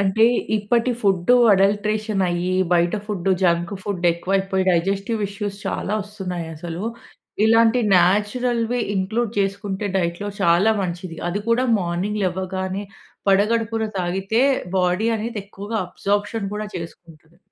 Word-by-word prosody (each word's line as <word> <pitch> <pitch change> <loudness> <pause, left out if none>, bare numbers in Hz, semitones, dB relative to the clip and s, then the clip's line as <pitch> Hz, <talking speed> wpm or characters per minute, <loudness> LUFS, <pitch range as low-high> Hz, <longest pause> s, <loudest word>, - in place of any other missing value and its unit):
అంటే, 200 +3 +3 0.3
ఇప్పటి 230 +4 +1
food 195 +2 +3 0.2
adulteration 205 +1 +1
అయ్యి 175 +1 -1 0.2
బయట 175 +1 +3
ఫుడ్డు, 195 -3 -1
జంక్ 170 0 +2
ఫుడ్డు, 185 -3 -4
ఎక్కువైపోయి 190 +2 0
డైజెస్టివ్ 195 +5 0
ఇష్యూస్ 200 0 -5
చాలా 205 - -2
వస్తున్నాయి 185 -5 -6
అసలు. 170 +3 -6 0.6
ఇలాంటి 225 +2 +4 0.2
నాచురల్‌వి 230 +6 +1 0.2
ఇంక్లూడ్ 215 +4 -1
చేసుకుంటే 200 0 -2
డైట్‌లో 175 +2 -1
చాలా 175 +6 +4
మంచిది. 175 -2 -5
అది 200 +4 -2
కూడా 235 +2 +3 0.2
మార్నింగ్ 185 +4 -2
లెవ్వగానే 190 +2 -3 0.4
పరిగడుపున 225 +3 +2
తాగితే 195 +6 0 0.4
బాడీ 180 +5 +1
అనేది 225 +1 -4
ఎక్కువగా 205 +2 -6
అబ్సా‌ర్ప్‌షన్ 205 +3 -2
కూడా 210 0 -3
చేసుకుంటది. 165 -1 -11
195 Hz, 115 wpm, -22 LUFS, 180-215 Hz, 0.6 s, ఇలాంటి